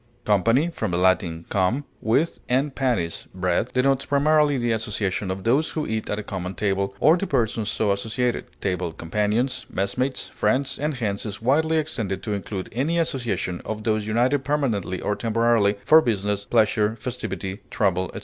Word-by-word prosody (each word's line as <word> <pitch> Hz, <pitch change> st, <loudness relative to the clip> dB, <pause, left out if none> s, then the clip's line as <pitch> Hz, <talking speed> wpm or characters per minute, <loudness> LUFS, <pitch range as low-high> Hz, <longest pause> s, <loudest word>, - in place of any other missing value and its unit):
Company, 115 Hz, -, +3 dB
from 110 Hz, -, -3 dB
the 85 Hz, -, -1 dB
Latin 90 Hz, -2 st, +1 dB
cum, 100 Hz, +9 st, +1 dB, 0.2 s
with, 140 Hz, +9 st, +1 dB
and 135 Hz, +3 st, +1 dB
panis, 120 Hz, -12 st, -1 dB
bread, 90 Hz, +5 st, 0 dB
denotes 135 Hz, +1 st, +2 dB
primarily 145 Hz, 0 st, +3 dB
the 120 Hz, -1 st, 0 dB
association 105 Hz, -3 st, -1 dB
of 95 Hz, 0 st, -4 dB
those 135 Hz, +9 st, +2 dB
who 155 Hz, -2 st, -3 dB
eat 110 Hz, 0 st, -3 dB
at 105 Hz, -, -1 dB
a 105 Hz, -, -4 dB
common 95 Hz, -2 st, -5 dB
table, 100 Hz, -1 st, -1 dB
or 155 Hz, -, +6 dB
the 195 Hz, -, -2 dB
persons 115 Hz, -6 st, 0 dB
so 105 Hz, -2 st, +1 dB
associated, 115 Hz, +4 st, -1 dB, 0.2 s
table 90 Hz, -3 st, -1 dB
companions, 105 Hz, -, -1 dB
messmates, 125 Hz, +7 st, -1 dB
friends, 135 Hz, +1 st, 0 dB
and 150 Hz, +1 st, -1 dB
hence 105 Hz, -5 st, -2 dB
is 105 Hz, -2 st, -5 dB
widely 160 Hz, +7 st, +2 dB
extended 110 Hz, -11 st, -2 dB
to 105 Hz, -, -2 dB
include 100 Hz, -1 st, -4 dB
any 145 Hz, +9 st, 0 dB
association 115 Hz, -, -1 dB
of 110 Hz, 0 st, -5 dB
those 110 Hz, -1 st, 0 dB
united 125 Hz, +5 st, +2 dB
permanently 125 Hz, -11 st, -1 dB
or 105 Hz, -, 0 dB
temporarily, 115 Hz, -2 st, +2 dB
for 160 Hz, +1 st, +8 dB
business, 105 Hz, -4 st, -1 dB
pleasure, 110 Hz, -1 st, +2 dB
festivity, 105 Hz, -5 st, -5 dB
travel, 95 Hz, -3 st, +1 dB
etc. 100 Hz, -, -7 dB
110 Hz, 170 wpm, -24 LUFS, 100-130 Hz, 0.2 s, for